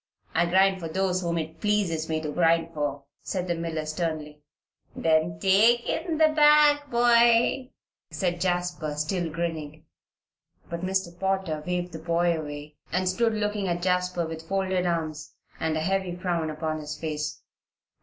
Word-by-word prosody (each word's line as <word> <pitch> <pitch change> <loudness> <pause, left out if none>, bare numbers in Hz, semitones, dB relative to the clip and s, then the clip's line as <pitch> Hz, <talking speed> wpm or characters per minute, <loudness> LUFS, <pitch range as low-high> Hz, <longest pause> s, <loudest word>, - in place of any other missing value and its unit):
"I 175 - +2
grind 190 +2 +3
for 165 - -5
those 185 +2 0
whom 170 -1 -1
it 160 0 -5
pleases 190 -7 0
me 160 0 0
to 150 -1 -4
grind 165 +1 +2
for," 145 -2 -3 0.2
said 185 -2 -3
the 175 - +1
miller, 165 -2 -3
sternly. 155 -2 -4 0.5
"Then 160 0 +1
take 215 +6 +4
in 325 -1 -1
the 315 0 +5
bag, 295 -1 +5
boy," 240 +1 +4 0.4
said 175 -2 -2
Jasper, 175 -4 -1
still 165 +3 -1
grinning. 160 -2 -4 0.9
But 170 0 -4
Mr. 190 0 -1
Potter 190 -5 -1
waved 180 0 -2
the 160 - -6
boy 170 +1 +1
away, 150 -1 -7
and 185 +2 0
stood 225 +4 +1
looking 210 -2 -1
at 175 0 -2
Jasper 180 -1 0
with 160 0 -8
folded 190 -2 0
arms 160 -3 -3 0.2
and 160 -1 0
a - - -1
heavy 190 +1 -1
frown 175 -3 -1
upon 155 0 -3
his 150 0 -6
face. 150 -2 -4
175 Hz, 155 wpm, -26 LUFS, 160-190 Hz, 0.9 s, the